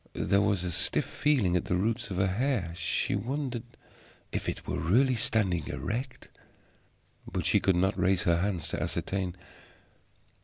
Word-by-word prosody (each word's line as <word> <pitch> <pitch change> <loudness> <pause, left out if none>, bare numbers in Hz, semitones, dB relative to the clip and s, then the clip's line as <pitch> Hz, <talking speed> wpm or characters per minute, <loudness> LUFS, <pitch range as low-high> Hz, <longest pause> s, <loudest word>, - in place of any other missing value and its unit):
There 100 0 +2
was 100 -3 +1
a 90 - -2
stiff - - +2
feeling 120 -12 +1
at 90 - 0
the 90 - 0
roots 110 +5 0
of 95 - -4
her 95 - +3
hair; 100 -3 0
she 85 -1 0
wondered 130 -1 -2 0.7
if - - -2
it - - -5
were 90 - -2
really 120 +11 +3
standing 105 -7 +1
erect. 125 +6 -4 1.0
But - - -2
she - - +4
could 95 - +2
not 95 +2 +1
raise 95 0 +2
her 85 -1 +3
hand 95 -1 -1
to - - -3
ascertain. 95 -2 -2
95 Hz, 160 wpm, -29 LUFS, 90-115 Hz, 1.0 s, she